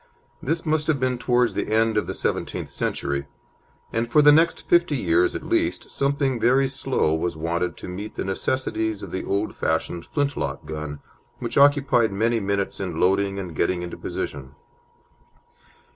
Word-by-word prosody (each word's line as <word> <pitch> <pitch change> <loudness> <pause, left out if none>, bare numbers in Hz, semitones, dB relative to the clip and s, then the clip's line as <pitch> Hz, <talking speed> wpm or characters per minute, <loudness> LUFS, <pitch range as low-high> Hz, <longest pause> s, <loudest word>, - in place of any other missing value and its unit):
This 165 +1 -1
must 155 -1 +1
have 155 -4 +2
been 130 -1 0
towards 125 -3 +2
the 105 - -3
end 110 0 +3
of 105 - 0
the - - -4
seventeenth - - -2
century, 70 0 -2 0.7
and 115 +1 -1
for 150 - +5
the 150 - +9
next 165 +3 +3
fifty 170 -3 +3
years 360 - +2
at - - -4
least 340 -1 0
something 140 -2 0
very 130 +4 +4
slow 130 - 0
was 80 +1 -1
wanted 85 +2 -2
to - - -8
meet 100 +4 -6
the - - -2
necessities 110 +1 -1
of - - -7
the 95 - -3
old 100 +2 -1
fashioned 85 -1 -2
flintlock 145 - -2
gun, 75 -1 -6 0.4
which - - -5
occupied 140 -5 +4
many 115 +4 +1
minutes 100 -1 -2
in 90 -4 -3
loading 100 +1 +2
and 90 -4 -6
getting 90 +4 0
into 85 - -6
position. 70 0 -5
110 Hz, 165 wpm, -24 LUFS, 90-140 Hz, 0.7 s, the